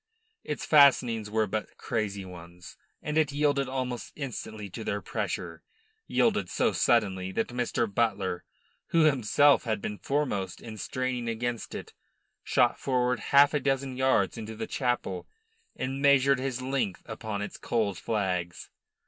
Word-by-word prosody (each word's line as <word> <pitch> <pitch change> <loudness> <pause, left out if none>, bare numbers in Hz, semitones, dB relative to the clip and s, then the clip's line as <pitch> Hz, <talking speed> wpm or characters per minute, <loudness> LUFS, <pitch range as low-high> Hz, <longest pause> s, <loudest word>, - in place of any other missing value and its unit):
Its - - -4
fastenings 125 -7 +5
were 110 0 +1
but 105 +1 -4
crazy 100 -4 -2
ones, 85 -1 -11 0.3
and 150 +1 0
it 150 -2 +2
yielded 145 -1 +1
almost 130 -2 -3
instantly 110 -6 -6
to 105 +4 -7
their 100 - -1
pressure - - -4 0.5
yielded - - +2
so - - +1
suddenly 95 -5 +2
that 110 +4 -1
Mr. 120 -1 0
Butler, 100 -4 -1 0.4
who 165 - +3
himself 140 0 +4
had 110 -2 0
been 105 +1 -5
foremost 125 -11 -1
in 110 -2 -9
straining 125 +1 -2
against 120 0 -3
it, - - -7 0.5
shot 120 -1 +2
forward 125 -1 +1
half 140 +1 +5
a 150 - +2
dozen 135 -1 -1
yards 125 -6 +2
into 110 0 -6
the 110 +1 -4
chapel 120 -9 -2 0.5
and 135 +1 -3
measured 140 -1 +5
his 130 -1 -3
length 130 -8 -2
upon 110 -2 -4
its - - -7
cold 105 -6 -1
flags. 90 -5 -2
120 Hz, 145 wpm, -28 LUFS, 105-135 Hz, 0.5 s, fastenings